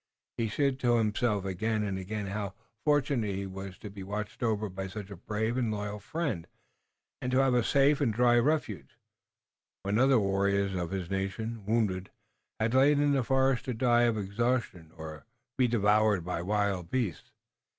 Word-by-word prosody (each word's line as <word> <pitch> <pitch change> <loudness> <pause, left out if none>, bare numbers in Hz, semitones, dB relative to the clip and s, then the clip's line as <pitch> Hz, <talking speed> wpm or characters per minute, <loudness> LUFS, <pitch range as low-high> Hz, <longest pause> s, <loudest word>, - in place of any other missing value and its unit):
He 115 -1 0
said 140 +3 0
to 120 -2 +3
himself 105 -2 +1
again 105 +3 -1
and 100 -2 -2
again 105 +2 -4
how 100 0 -4 0.3
fortunate 140 -8 +1
he 100 0 -3
was 95 -1 -7
to 105 - -8
be 100 -1 -9
watched 105 +2 -5
over 110 -3 0
by 95 0 -5
such 100 +1 -8
a - - -6
brave 110 +6 -2
and 120 -4 0
loyal 105 0 -4
friend, 135 - -3 0.7
and 125 - -2
to 130 - +2
have 135 -1 +4
a 120 -1 +3
safe 140 +3 +3
and 130 -5 +3
dry 120 +2 +4
refuge, 120 - -1 0.9
when 100 +3 +1
other 130 0 +5
warriors 100 0 +1
of 90 -2 -2
his 95 -2 -4
nation, 105 +3 -3
wounded, 105 -5 0 0.5
had 110 +2 +1
lain 140 +2 +5
in 145 0 +3
the 135 -2 +2
forest 135 +1 +2
to 125 -3 -2
die 120 0 +4
of 115 -2 +1
exhaustion 100 -4 -1
or 80 -1 -7
to - - -27 0.3
be 130 -2 +3
devoured 105 -4 +3
by 90 -1 -2
wild 100 -2 0
beasts. 115 -8 -2
105 Hz, 180 wpm, -30 LUFS, 95-125 Hz, 0.9 s, other